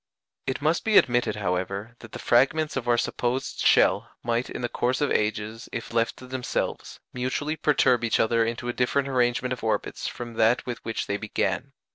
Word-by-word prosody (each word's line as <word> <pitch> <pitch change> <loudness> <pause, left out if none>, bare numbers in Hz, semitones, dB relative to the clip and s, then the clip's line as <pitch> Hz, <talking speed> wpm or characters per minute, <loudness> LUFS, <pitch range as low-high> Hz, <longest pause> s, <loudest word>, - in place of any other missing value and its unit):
It 130 +2 -2
must 160 +3 +2
be 220 -2 +4
admitted, 120 -4 +3
however, 100 +3 -3
that 115 - -12
the - - -6
fragments 150 +5 +2
of 125 -3 -3
our 120 0 +4
supposed 125 +2 -2
shell - - +4
might 120 +1 -1
in - - -6
the - - +1
course 125 +2 -1
of 145 -2 +1
ages, 110 +1 -1
if 115 - -6
left 115 0 +1
to 130 - -11
themselves, 125 0 -3
mutually 130 +5 -2
perturb 130 -6 +3
each 115 - +1
other 115 +1 +3
into 115 +2 -3
a 120 - -1
different 135 +3 +1
arrangement 125 -1 +1
of 125 - -8
orbits 110 -2 -1
from 120 -1 -6
that 115 +2 +3
with 120 -2 -5
which 115 - -3
they 100 - -2
began. 105 +5 -2
120 Hz, 190 wpm, -26 LUFS, 115-130 Hz, -, be